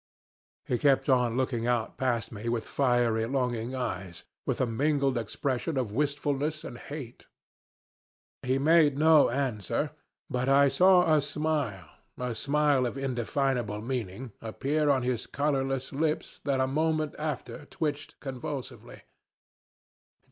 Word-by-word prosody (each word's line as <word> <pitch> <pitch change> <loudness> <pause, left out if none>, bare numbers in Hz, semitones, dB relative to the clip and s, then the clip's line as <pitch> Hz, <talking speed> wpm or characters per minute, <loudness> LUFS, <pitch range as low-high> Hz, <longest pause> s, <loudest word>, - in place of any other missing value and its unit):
"He 120 - -1
kept 140 0 +3
on 125 -2 +3
looking 125 -3 0
out 120 -2 0
past 120 -3 0
me 115 +1 -4
with 115 -1 -1
fiery, 120 -4 +1
longing 125 -2 -1
eyes, 95 -8 -4 0.2
with - - 0
a - - +3
mingled 140 +3 +1
expression 125 +6 -2
of 125 -6 -1
wistfulness 145 +3 -1
and 120 - -8
hate. 140 -5 -8 1.1
He 130 +1 +1
made 150 0 +4
no 155 0 +6
answer, 130 - -1 0.4
but 125 +1 -1
I 140 0 +6
saw 180 +3 +5
a 150 - +4
smile, 145 - -2 0.3
a 125 -1 -2
smile 145 0 +2
of 120 - -5
indefinable 125 -4 -1
meaning, 120 -1 -4
appear 145 +7 0
on 135 -3 +3
his 125 -2 -1
colorless 135 -2 -1
lips 155 +2 -1
that 140 -2 +1
a 130 - +3
moment 155 +2 0
after 150 -1 -4
twitched 155 -6 -4
convulsively. 135 0 -7
135 Hz, 130 wpm, -28 LUFS, 120-145 Hz, 1.1 s, no